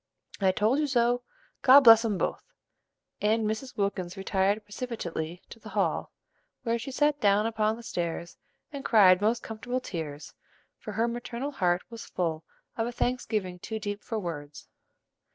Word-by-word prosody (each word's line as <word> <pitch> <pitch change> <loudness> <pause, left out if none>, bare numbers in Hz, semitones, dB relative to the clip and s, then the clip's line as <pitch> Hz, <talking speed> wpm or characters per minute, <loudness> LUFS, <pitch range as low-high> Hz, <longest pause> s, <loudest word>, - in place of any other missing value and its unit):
"I 190 -2 +4
told 215 +8 +2
you 300 - +1
so; 245 -2 +2 0.4
God 270 +2 +9
bless 225 -3 +9
'em 215 -4 0
both!" - - -2 0.8
and 220 +1 +2
Mrs. 220 +5 -3
Wilkins 195 -2 -2
retired 195 +2 +1
precipitately 180 -7 -5
to 230 - -10
the - - -11
hall, - - -1 0.5
where 235 -1 0
she 245 - -6
sat 295 +2 +1
down 205 +1 +4
upon 220 -1 +1
the 235 - -11
stairs 170 -6 -4 0.4
and 280 -1 -6
cried 190 -5 +6
most 225 +3 +1
comfortable 245 +3 -3
tears; 160 - -6 0.5
for - - -7
her 230 +1 +1
maternal 240 +3 -4
heart 180 -9 +1
was 230 -1 -8
full 165 -3 -2 0.3
of 225 0 0
a - - -3
thanksgiving 220 -7 -2
too 220 +4 -5
deep 205 -1 -4
for 225 - -4
words. 150 -7 -6
215 Hz, 160 wpm, -28 LUFS, 185-235 Hz, 0.8 s, God